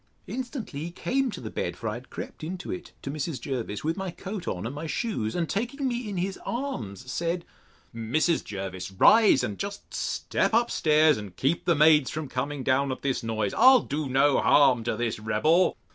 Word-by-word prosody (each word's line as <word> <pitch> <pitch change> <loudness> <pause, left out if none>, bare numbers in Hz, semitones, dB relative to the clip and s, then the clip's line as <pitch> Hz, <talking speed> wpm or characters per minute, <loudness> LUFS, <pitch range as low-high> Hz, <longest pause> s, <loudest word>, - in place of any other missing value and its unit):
Instantly 250 - -5
he - - -4
came 265 +8 0
to - - -6
the 110 - -7
bed 85 - -3
(for 115 - -5
I 105 - -1
had 125 +3 -9
crept - - -8
into 180 +3 -5
it, 180 - -6
to 135 - -4
Mrs. 150 -1 -3
Jervis, 120 -7 -4
with 160 +3 -1
my 195 -1 -3
coat 185 +2 -7
on, 90 +3 -3
and 120 - -4
my 150 +3 -5
shoes); 155 - -2
and 170 -2 0
taking 245 - -2
me 240 -3 -3
in 200 - -4
his 190 +2 -2
arms, 130 - -4
said, 170 +2 -2 0.5
Mrs. 135 +9 0
Jervis, 95 -2 -5
rise, 210 - +5
and 105 - -3
just 200 0 -6
step - - 0
up 235 +1 +3
stairs 155 0 +4
to 105 -1 -6
keep 135 - -1
the 170 - +3
maids 150 -2 +5
from 155 -1 -4
coming 140 +2 -3
down 135 +1 +2
at 130 - -6
this 135 -3 0
noise: 110 -3 -2
I'll 255 +2 +7
do 145 -1 -3
no 135 +2 +3
harm 130 -5 +5
to 110 - -1
this 115 -2 -2
rebel. 155 +12 +2
150 Hz, 205 wpm, -27 LUFS, 120-185 Hz, 0.5 s, I'll